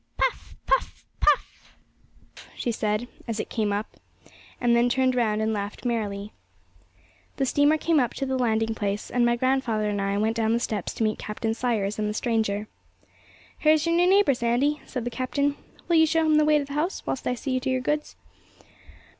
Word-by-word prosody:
'Puff, - - -1
puff, - - 0
puff,' - - 0 0.8
she 240 - -2
said, 215 +1 -1 0.2
as 225 -2 -3
it - - -4
came 215 -3 0
up, 205 +2 -4 0.6
and 240 -1 +3
then 240 +1 +3
turned 260 0 +2
round 220 -3 +1
and 220 0 0
laughed 205 +3 -5
merrily. 210 -3 -2 1.0
The 270 - +1
steamer 290 +4 +3
came 325 0 +2
up 245 -3 0
to 275 - -2
the 265 0 -1
landing 225 -3 +1
place, 205 -1 -3
and 245 0 +2
my 240 0 +3
grandfather 240 -4 0
and 205 -1 -2
I 200 0 0
went 220 +2 +1
down 225 0 +2
the 235 - +2
steps 215 -5 -3
to - - -1
meet 215 0 0
Captain 220 +1 -3
Sayers 220 -4 -1
and 210 0 0
the 210 - -4
stranger. 215 -3 -1 0.9
'Here's 310 0 +4
your 335 - +1
new 355 +1 +4
neighbour, 390 -6 +5
Sandy,' 245 +5 0
said 250 -3 -4
the 245 - -2
captain. 280 +3 -1 0.3
'Will 340 -2 +3
you 320 0 +6
show 325 +1 +2
him 310 -1 +4
the 305 - +4
way 305 0 +4
to 300 - +3
his 280 - -12
house, 300 +6 -2
whilst 260 - -3
I 250 - 0
see 255 +1 -2
to 265 +1 -3
your 260 0 +1
goods?' 300 +3 -2
240 Hz, 195 wpm, -25 LUFS, 215-280 Hz, 1.0 s, you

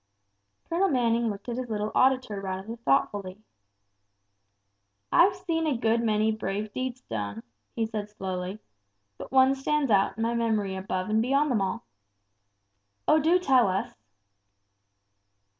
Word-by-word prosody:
Colonel 370 +4 +1
Manning 235 -3 +1
looked 200 +1 -7
at 240 0 -3
his 255 -1 -4
little 210 -1 -2
auditor 255 -6 +2
rather 190 +3 -5
thoughtfully. 190 0 0 1.7
"I've 380 +3 +5
seen 335 -4 -2
a 280 -5 +1
good 230 0 +1
many 215 -1 +2
brave 210 0 -4
deeds 255 -1 -4
done," 105 0 -5 0.3
he 225 - 0
said, 215 -2 -5
slowly; 190 -1 -5 0.6
"but - - -8
one 265 0 +5
stands 275 -1 0
out 195 0 +3
in 225 - -1
my 230 +1 0
memory 220 -4 0
above 190 0 -3
and 220 +1 +3
beyond 275 +4 +2
them 220 -5 +1
all." 195 +4 -2 1.2
"Oh, 310 - +5
do 325 +4 +4
tell 265 - +4
us." 190 0 -2
225 Hz, 140 wpm, -27 LUFS, 200-260 Hz, 1.7 s, I've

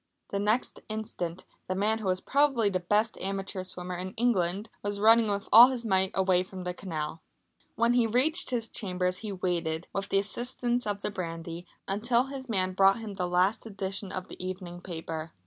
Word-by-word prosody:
The 200 - -1
next 215 +5 +1
instant 185 -5 -4 0.2
the 185 - -1
man 215 +3 +1
who 215 - -4
was 185 0 +1
probably 270 -7 +2
the 185 - 0
best 210 +5 +1
amateur 195 0 -3
swimmer 180 -1 -4
in 185 +1 -6
England, 210 -3 +1
was 205 0 -2
running 225 +1 +6
with 200 0 -2
all 235 +3 +11
his 250 -3 -3
might 190 -2 +3
away 185 -1 +3
from 185 0 -7
the 180 0 -3
canal. 160 -4 -5 0.5
When 235 +1 +3
he 240 -2 +3
reached 290 +10 +2
his 235 -3 -1
chambers 180 -3 -1
he 215 +1 -6
waited, 175 -3 -2
with 195 0 -3
the - - +2
assistance 240 +4 -1
of 205 -1 -2
the - - -2
brandy, 170 -2 -6 0.2
until 235 +5 +2
his 265 -1 -6
man 185 -4 +1
brought 195 +2 +5
him 220 -3 -6
the 180 -2 -2
last 180 +4 +2
edition 195 -1 -3
of 185 -1 -4
the - - -9
evening 185 -1 -6
paper. 165 -2 -6
195 Hz, 190 wpm, -29 LUFS, 180-225 Hz, 0.5 s, all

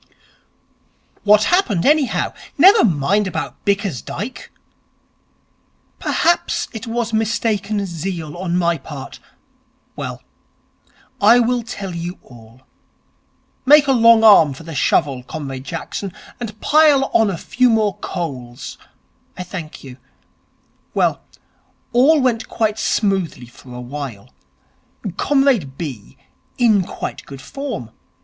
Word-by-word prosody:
'What 210 0 +5
happened, 250 - +1
anyhow? 295 -2 +2 0.2
Never 385 +8 +7
mind 190 +4 +2
about 165 -3 -5
Bickersdyke.' 200 - -3 1.5
'Perhaps 345 +1 +1
it 225 0 -7
was 230 -1 -2
mistaken 215 -2 0
zeal 170 -3 -5
on 175 -1 -2
my 170 -2 +1
part.... 135 -1 -9 0.8
Well, - - -6 1.0
I 220 +4 +7
will 245 +1 +1
tell 205 -5 -6
you 170 +2 -5
all. 120 0 -16 1.0
Make 290 +2 +7
a 275 - +2
long 230 -2 +6
arm 165 -10 +7
for 150 - -12
the 165 0 -8
shovel, 135 -1 +1
Comrade 135 -1 -7
Jackson, 170 +5 -5 0.3
and 220 -3 -7
pile 295 -3 +4
on 225 -2 +4
a 185 - -3
few 250 +8 +1
more 215 -4 +2
coals. 135 -8 -6 0.6
I 180 - -4
thank 175 -4 -8
you. 130 -2 -11 1.0
Well, - - +1 0.7
all 280 +6 +5
went 250 -2 0
quite 220 -1 -1
smoothly 190 - 0
for 120 +1 -16
a - - -7
while. 125 - -7 0.9
Comrade 265 - +1
B. 135 -6 -7 0.4
in 225 -5 +4
quite - - -6
good 135 -1 -9
form. 230 - -6
195 Hz, 115 wpm, -19 LUFS, 145-230 Hz, 1.5 s, Never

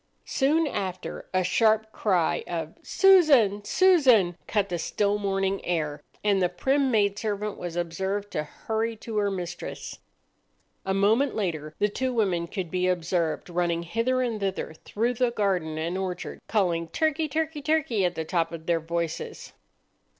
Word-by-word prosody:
Soon 305 +4 +2
after 190 -9 -4
a 185 0 +2
sharp 220 +3 +2
cry 185 -8 +1
of 165 -2 -4
"Susan! 285 - +5
Susan!" 255 - +4
cut 205 -2 0
the 175 -1 -2
still 205 +4 0
morning 195 -1 -1
air, 155 -4 -2 0.2
and 200 -2 +3
the 180 - +3
prim 270 +9 +1
maid 205 -4 +2
servant 210 -1 -2
was 175 -1 -6
observed 190 +4 -2
to - - -1
hurry 220 +8 -3
to 220 0 -6
her 205 -1 +2
mistress. 175 -3 -6 0.9
A 190 - +1
moment 220 +8 +3
later 155 -7 -3
the 210 - +2
two 260 +5 -2
women 190 -8 0
could 180 -3 -5
be 185 0 +1
observed 170 -2 0
running 175 -1 0
hither 230 +8 0
and 230 -3 -2
thither 190 -5 -3
through 225 +9 -2
the 250 0 +1
garden 185 -8 -1
and 165 +3 -2
orchard, 185 -2 -5
calling, 175 -6 +1
"Turkey! 315 - 0
turkey! 315 0 -2
turkey!" 285 -9 +1
at 175 -1 0
the 160 - -3
top 165 0 0
of 165 -1 -8
their 170 -1 +2
voices. 170 0 -4
195 Hz, 160 wpm, -26 LUFS, 175-230 Hz, 0.9 s, Susan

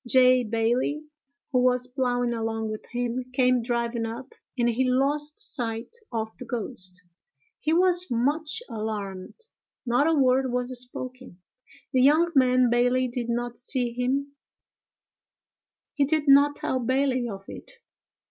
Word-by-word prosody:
J. 255 0 +5
Bailey 235 +6 0 0.5
who 255 - +3
was 250 0 +2
ploughing 245 -2 -1
along 225 -1 -2
with 215 - -7
him, 245 0 -2
came 250 -1 +3
driving 235 0 -1
up, 240 +4 -8 0.2
and 240 -1 +2
he 255 +2 +1
lost 290 +4 0
sight 230 - -4 0.2
of 220 -2 -3
the 250 - -7
ghost. 200 -6 -5 0.6
He 310 - -1
was 360 +1 +3
much 295 - -1
alarmed: 205 -4 -5 0.5
not 245 +5 +2
a 325 - +3
word 260 -2 +3
was 250 +1 -2
spoken. 255 -5 -9 0.5
The 255 - +4
young 310 +6 +4
man 255 -3 +4
Bailey 250 +1 +2
did 240 -1 -4
not 240 0 -2
see 245 -1 -1
him; 275 +3 -1 1.6
he 285 - +2
did 305 +1 0
not 285 +1 +6
tell 260 - -2
Bailey 255 0 0
of 195 -2 -8
it. - - -10
250 Hz, 140 wpm, -26 LUFS, 235-270 Hz, 1.6 s, not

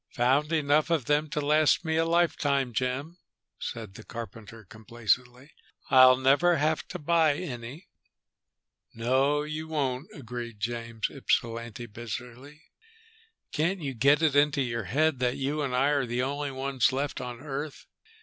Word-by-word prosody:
"Found 135 +6 +2
enough 150 0 +2
of 160 -7 +1
them 150 +2 +1
to 150 - -2
last 150 +3 +3
me 160 0 0
a 165 0 +2
lifetime, 145 -6 +1
Jim," 135 +9 -2 0.4
said 110 -4 -6
the 110 - -11
carpenter 115 -1 -9
complacently. 120 +5 -2 0.4
"I'll 130 -1 +8
never 145 +7 +4
have 155 +2 0
to - - -6
buy 160 -1 +3
any." 135 0 -7 1.1
"No, 135 +5 +1
you 155 +1 -5
won't," 140 -4 -2
agreed 120 -4 -7
James 115 0 -3
Ypsilanti 115 0 -2
bitterly. 125 +6 -8 0.9
"Can't 170 +3 -1
you 135 -2 -3
get 140 +6 +3
it 150 -3 +3
into 145 -1 +3
your 115 -3 -3
head 145 - +1
that 125 +1 0
you 140 +3 -1
and 135 -3 -1
I 135 +3 +3
are 140 -3 +1
the 120 +2 -1
only 145 +2 -2
ones 135 -1 0
left 140 +2 -3
on 125 -1 -6
Earth? 145 +1 -6
135 Hz, 150 wpm, -28 LUFS, 120-150 Hz, 1.1 s, I'll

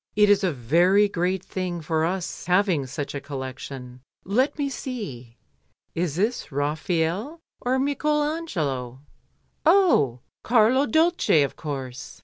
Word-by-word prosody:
"It 210 0 +5
is 205 0 +3
a 185 - +2
very 170 - +3
great 185 0 -1
thing 180 -2 -3
for 160 0 0
us 180 0 -4
having 180 -6 +2
such 140 +2 -5
a 140 - -4
collection. 130 -2 -7 0.2
Let 255 - +1
me 285 -2 0
see, 150 - -6 0.6
is 165 -3 -1
this 215 +1 -1
Raphael 165 - -1 0.2
or 255 +1 0
Michael 295 +2 +1
Angelo? 150 - -3 0.6
Oh! 315 - +4 0.2
Carlo 245 +4 +4
Dolce, 320 - +3
of 140 - -3
course." 135 -3 -6
180 Hz, 125 wpm, -24 LUFS, -, 0.6 s, It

